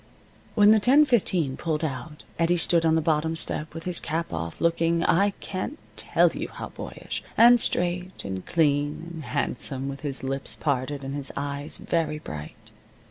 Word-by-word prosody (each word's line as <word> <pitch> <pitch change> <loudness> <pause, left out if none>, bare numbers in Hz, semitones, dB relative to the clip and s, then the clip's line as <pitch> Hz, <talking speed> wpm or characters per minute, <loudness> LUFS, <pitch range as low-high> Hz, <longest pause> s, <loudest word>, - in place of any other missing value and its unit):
When 210 -1 +7
the 220 - +6
10:15 230 - +3
pulled 160 -1 -1
out 150 +2 -6 0.2
Eddie 170 +1 +3
stood 165 0 +2
on 160 - +4
the 160 - +1
bottom 160 +1 +1
step, 155 0 -3
with 165 - -6
his 180 -2 0
cap 160 - -3
off, 85 0 -4
looking 170 0 +2
I 200 +4 +4
can't 195 +10 -4 0.2
tell - - +3
you - - -4
how - - -8
boyish, - - -6 0.2
and 240 0 +7
straight, 180 +1 -2
and 95 -1 -4
clean, 145 0 +1
and 160 -2 -7
handsome, 135 -2 -1
with 140 0 -6
his 140 -3 -2
lips 135 +1 -1
parted, 140 -1 -2
and 135 +1 -4
his 140 -1 -1
eyes 145 +1 -3
very 160 -2 -1
bright. 75 - -9
160 Hz, 170 wpm, -26 LUFS, 140-175 Hz, 0.2 s, When